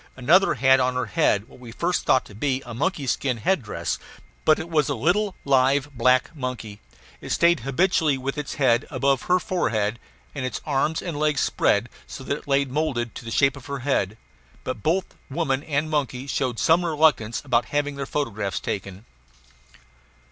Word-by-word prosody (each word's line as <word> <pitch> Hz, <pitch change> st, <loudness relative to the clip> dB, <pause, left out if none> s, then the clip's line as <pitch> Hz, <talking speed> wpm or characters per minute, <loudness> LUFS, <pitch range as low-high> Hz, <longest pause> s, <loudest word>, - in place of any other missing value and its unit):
Another 170 Hz, +10 st, +4 dB
had 130 Hz, 0 st, +5 dB
on 125 Hz, 0 st, +1 dB
her 125 Hz, 0 st, 0 dB
head 100 Hz, 0 st, +1 dB
what -, -, -17 dB
we 125 Hz, -2 st, -11 dB
at 115 Hz, -, -11 dB
first 175 Hz, +1 st, -1 dB
thought 130 Hz, -, +4 dB
to -, -, -14 dB
be 130 Hz, +4 st, -1 dB
a 120 Hz, -, -7 dB
monkey 145 Hz, +3 st, -1 dB
skin 130 Hz, 0 st, 0 dB
head 175 Hz, -, +1 dB
dress. 110 Hz, -, -3 dB, 0.5 s
But 155 Hz, -, +5 dB
it 160 Hz, -, -5 dB
was 155 Hz, -3 st, +1 dB
a 140 Hz, -, 0 dB
little, 185 Hz, -, +1 dB
live, 140 Hz, +1 st, +2 dB
black 125 Hz, +5 st, +2 dB
monkey. 125 Hz, -7 st, -5 dB, 0.4 s
It -, -, -8 dB
stayed 170 Hz, 0 st, +3 dB
habitually 160 Hz, +1 st, +1 dB
with 135 Hz, +2 st, -3 dB
its 150 Hz, -2 st, -5 dB
head 125 Hz, -4 st, +2 dB
above 135 Hz, -2 st, +1 dB
her 180 Hz, -, +5 dB
forehead, 115 Hz, -, -1 dB, 0.3 s
and -, -, -4 dB
its 130 Hz, -, -3 dB
arms 150 Hz, +2 st, 0 dB
and 165 Hz, -5 st, -4 dB
legs 150 Hz, -2 st, +1 dB
spread 100 Hz, +4 st, +2 dB, 0.2 s
so 135 Hz, -, -8 dB
that 140 Hz, -, -1 dB
it -, -, -20 dB
lay 140 Hz, 0 st, +3 dB
moulded 130 Hz, -4 st, -2 dB
to -, -, -9 dB
the -, -, -5 dB
shape 135 Hz, +3 st, +2 dB
of 140 Hz, -1 st, -12 dB
her 140 Hz, -2 st, -4 dB
head; 110 Hz, -7 st, 0 dB, 0.5 s
but -, -, -4 dB
both 175 Hz, -, +1 dB, 0.2 s
woman 140 Hz, -2 st, -1 dB
and 150 Hz, 0 st, -1 dB
monkey 135 Hz, -3 st, -1 dB
showed 130 Hz, -3 st, -2 dB
some 165 Hz, +7 st, +3 dB
reluctance 150 Hz, -8 st, +2 dB
about 120 Hz, -3 st, +2 dB
having 145 Hz, +2 st, -1 dB
their 140 Hz, -1 st, -5 dB
photographs 110 Hz, -9 st, -2 dB
taken. 100 Hz, +2 st, -5 dB
135 Hz, 190 wpm, -24 LUFS, 120-155 Hz, 0.5 s, had